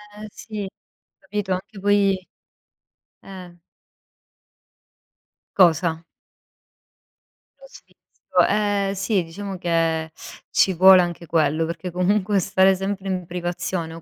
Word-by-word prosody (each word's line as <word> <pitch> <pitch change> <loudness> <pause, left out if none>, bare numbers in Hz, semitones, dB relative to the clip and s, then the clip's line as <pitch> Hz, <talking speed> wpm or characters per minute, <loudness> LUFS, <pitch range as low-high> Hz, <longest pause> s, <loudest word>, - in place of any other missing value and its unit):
Eh, 215 +1 -9
sì, 210 -3 -7 0.5
capito? 200 0 -5
Anche 195 +3 -7
poi 195 -2 +1 0.9
eh. 180 -3 -11 2.0
Cosa? 170 -2 +3 1.6
Lo - - -15
sfizio, 185 - -3
ehm, 205 -1 0
sì 195 -1 0
diciamo 195 +4 -7
che 165 -2 -1 0.4
ci 190 - +2
vuole 185 +1 +7
anche 175 -1 -4
quello, 160 -1 +1
perché 170 +2 -6
comunque 195 +3 +1
stare 190 +1 +3
sempre 195 +1 -4
in 185 -2 -3
privazione 175 -1 -4
o 165 - -10
185 Hz, 105 wpm, -22 LUFS, 170-200 Hz, 2.0 s, vuole